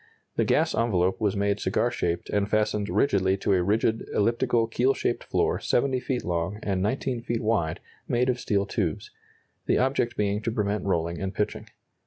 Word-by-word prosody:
The - - +2
gas - - +2
envelope 95 -5 +1
was 105 -2 +1
made 100 +1 0
cigar - - +1
shaped 85 0 -2
and 100 0 0
fastened 105 -1 +1
rigidly 95 -8 +2
to 100 - +1
a 90 - +3
rigid 110 +4 +1
elliptical 115 +2 +2
keel 125 +4 +1
shaped - - -1
floor - - 0
70 130 +1 +1
feet 125 -1 -3
long 85 +3 -1
and 95 -2 -1
19 120 +3 -1
feet 115 -1 -2
wide, 100 -8 0 0.3
made 125 +1 +1
of 125 -1 0
steel 100 -4 0
tubes - - -2 0.6
the - - +3
object 130 -2 0
being 105 0 0
to 115 - -1
prevent 105 -2 -1
rolling 85 -3 -1
and 95 0 -3
pitching. 105 - -2
105 Hz, 180 wpm, -26 LUFS, 95-120 Hz, 0.6 s, a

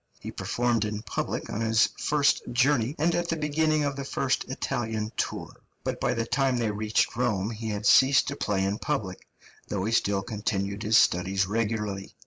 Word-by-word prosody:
He - - -7
performed 120 -2 0
in 105 0 -4
public 105 - -3
on 110 - -3
his 110 0 +3
first 145 -1 +2
journey 130 +1 +2
and 165 +3 +2
at 175 0 -1
the 165 - +1
beginning 155 0 +1
of 140 -1 -1
the 140 - -4
first 135 -1 -1
Italian 110 -4 -3
tour; - - -3 0.3
but - - -3
by 125 - +1
the 115 0 -1
time 135 +1 +1
they 115 -3 0
reached 105 +1 0
Rome 110 -4 0
he 110 0 -5
had 105 0 -3
ceased 135 +5 +6
to 140 - -4
play 100 -7 -1
in 100 +2 -2
public, 95 -3 -3 0.4
though 100 -3 -2
he 110 - -1
still 100 -3 +1
continued 100 -1 -3
his 110 +1 +4
studies 95 +2 +3
regularly. 105 -2 -2
110 Hz, 185 wpm, -27 LUFS, 105-135 Hz, 0.4 s, ceased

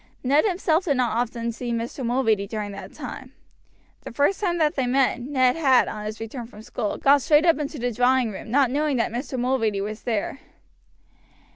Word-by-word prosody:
Ned 280 - +3
himself 355 -3 +1
did 285 -6 +1
not 245 -3 +1
often 235 0 -2
see 240 +1 -5
Mr. 235 +3 -3
Mulready 230 -5 +1
during 210 -1 -4
that 195 -1 -9
time. 260 -1 -8 0.7
The - - -8
first 285 +10 +1
time 350 -4 0
that 310 -2 +2
they 260 -3 -1
met, 255 -1 +2
Ned 255 -1 +2
had, 270 -6 +4
on 210 0 -6
his 215 +1 -5
return 225 +2 -6
from 215 -2 -13
school, 225 -3 -3
gone 280 +1 +5
straight 300 +3 +3
up 330 -3 +4
into 295 +1 -4
the 245 -1 -1
drawing 245 0 +2
room, 205 - -8
not 265 +1 +3
knowing 290 -1 0
that 230 - 0
Mr. 255 +2 -4
Mulready 240 -5 0
was 210 +2 -5
there. 235 +3 -2
250 Hz, 195 wpm, -24 LUFS, 230-280 Hz, 0.7 s, gone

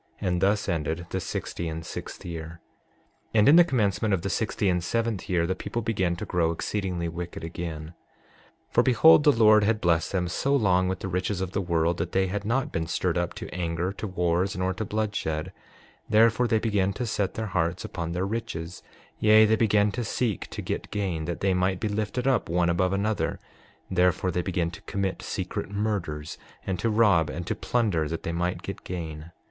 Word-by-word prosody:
And 90 -1 -1
thus 100 +2 +2
ended 80 -1 -2
the 95 - -1
sixty 85 -1 -4
and 80 0 -5
sixth - - -7
year. 80 -1 -6 0.8
6:16 - - +6
And 105 - +6
in 150 - +8
the 175 - +9
commencement 110 - +1
of 85 - -5
the 95 - -1
sixty 105 -1 -1
and 90 -2 +1
seventh 115 0 -1
year 85 -2 +2
the 95 - 0
people 105 +5 -4
began 95 -6 0
to 85 - -5
grow 85 -2 +1
exceedingly 90 0 -2
wicked 85 0 -6
again. 80 -1 -6 0.8
6:17 - - -33
For - - +5
behold, 150 +5 +6
the 150 - +7
Lord 110 -4 +5
had 110 +1 +2
blessed 85 -3 +1
them 90 -2 0
so 140 +11 0
long 95 -7 +3
with 95 +1 -3
the - - -3
riches 90 +1 -1
of 95 -1 -3
the 100 - -1
world 85 -1 +1
that 85 +1 -3
they 95 0 +3
had 100 +2 -3
not 130 +5 0
been 80 0 -2
stirred 90 0 0
up 85 -1 -1
to - - -7
anger, 85 +1 -2
to 105 +2 -5
wars, 90 +1 0
nor 95 0 0
to 95 - -4
bloodshed; 95 -6 -2 0.6
therefore 115 +2 +4
they 115 - +2
began 100 -3 +1
to 125 - -3
set 105 -3 -1
their 110 - -2
hearts 85 -3 -1
upon 85 -2 -4
their 90 +2 -1
riches; 90 -6 -4 0.4
yea, 110 0 +7
they 110 +1 +3
began 105 -2 +3
to 120 +4 -3
seek 110 -2 -2
to - - -7
get - - -4
gain 95 -6 -2
that 85 0 -4
they 95 -1 +2
might 90 0 +1
be - - -1
lifted 105 +4 -2
up 130 -9 +1
one 85 0 +2
above 90 +2 +1
another; 100 +2 0 0.5
therefore 90 0 +2
they 90 - 0
began 85 -2 -1
to 90 - -11
commit 100 -1 -2
secret - - -4
murders, 100 -7 -3 0.3
and 95 -2 -2
to 115 - +1
rob 100 -8 +4
and 85 +2 -5
to - - -1
plunder, 100 -11 0
that 80 +2 -4
they 85 - -2
might 90 +1 -2
get - - -6
gain. 80 -2 -6
95 Hz, 205 wpm, -26 LUFS, 85-105 Hz, 0.8 s, the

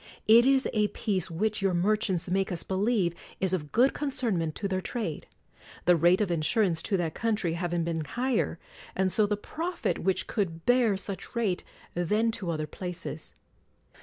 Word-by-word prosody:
It 230 +3 +7
is 270 -1 +4
a 210 -2 +3
peace 200 -5 -2
which, 210 +6 -1
your 195 -2 +2
merchants 190 -1 +1
make 190 +1 0
us 175 - -2
believe, 195 -2 +1 0.3
is 190 -1 +1
of 150 -5 -2
good 250 +4 +4
concernment 235 - -1
to 200 - -2
their 185 -1 -1
trade; 200 -8 -4 0.6
the 175 - +6
rate 175 +4 +4
of 200 -4 0
in 170 - +1
surance 175 -2 +2
to 200 - +1
that 165 -3 -1
country 215 -7 0
having 175 0 -1
been 165 -1 -2
higher, 240 - -1 0.4
and 190 0 +1
so 215 +1 +3
the 210 0 0
profit 335 - -3
which 190 +1 0
could 165 -7 -3
bear 245 -5 +4
such 195 +3 -6
rate, 210 -6 0 0.3
than 210 +7 +1
to 210 -6 -4
other 155 -2 -1
places. 175 -1 -6
190 Hz, 175 wpm, -28 LUFS, 175-220 Hz, 0.6 s, It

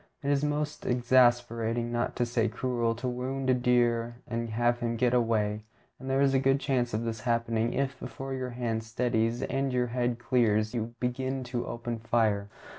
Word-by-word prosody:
It 140 - +1
is 140 0 +2
most 150 0 -1
exasperating, 120 -2 +2
not 120 0 -1
to 120 - +1
say 115 -1 +1
cruel, 120 -3 -1
to 125 +3 -4
wound 130 +2 -1
a - - +5
deer 120 -1 +2
and 115 -1 -3
have 120 +2 +1
him 115 -1 -1
get 125 +1 +2
away; 110 -3 +1 0.4
and 130 - -7
there 135 +1 +2
is 140 -1 +4
a 135 - +4
good 135 +1 +3
chance 125 -4 0
of 110 - -1
this 115 -1 -3
happening 115 0 0
if, 135 -1 -1
before 135 0 -6
your 130 -1 -3
hand 120 -2 -2
steadies 115 0 0
and 135 0 -1
your 125 -1 +1
head 120 -1 0
clears, 115 -3 +1
you 115 0 -3
begin 130 +2 -2
to 120 -1 -3
open 120 0 -4
fire. 110 -3 +1
120 Hz, 190 wpm, -29 LUFS, 115-130 Hz, 0.4 s, a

